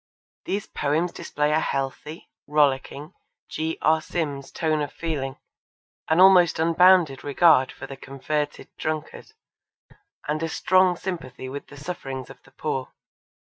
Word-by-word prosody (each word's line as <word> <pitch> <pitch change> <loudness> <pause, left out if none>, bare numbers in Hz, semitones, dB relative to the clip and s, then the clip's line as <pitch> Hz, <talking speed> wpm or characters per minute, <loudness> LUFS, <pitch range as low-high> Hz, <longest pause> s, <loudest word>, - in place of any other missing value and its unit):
These 200 +1 -2
poems 155 +4 -1
display 150 -2 -2
a 155 - +3
healthy, 140 +3 -4 0.2
rollicking, 145 +1 0 0.4
G. 160 +1 -3
R. 160 +1 +4
Sims 145 -5 -4
tone 155 -2 0
of 145 - -3
feeling, 145 -5 -4 0.7
an 160 +2 +3
almost 185 -3 +6
unbounded 170 -3 +4
regard 145 -2 +4
for 135 - -9
the 135 0 -9
converted 145 +3 -4
drunkard, 155 - -5 0.9
and 150 +1 -1
a 165 - -1
strong 185 +2 +3
sympathy 150 -10 -6
with 140 +2 -7
the 145 - -13
sufferings 135 -5 -6
of 135 - -15
the 135 - -22
poor. 130 -2 -4
150 Hz, 130 wpm, -24 LUFS, 135-165 Hz, 0.9 s, almost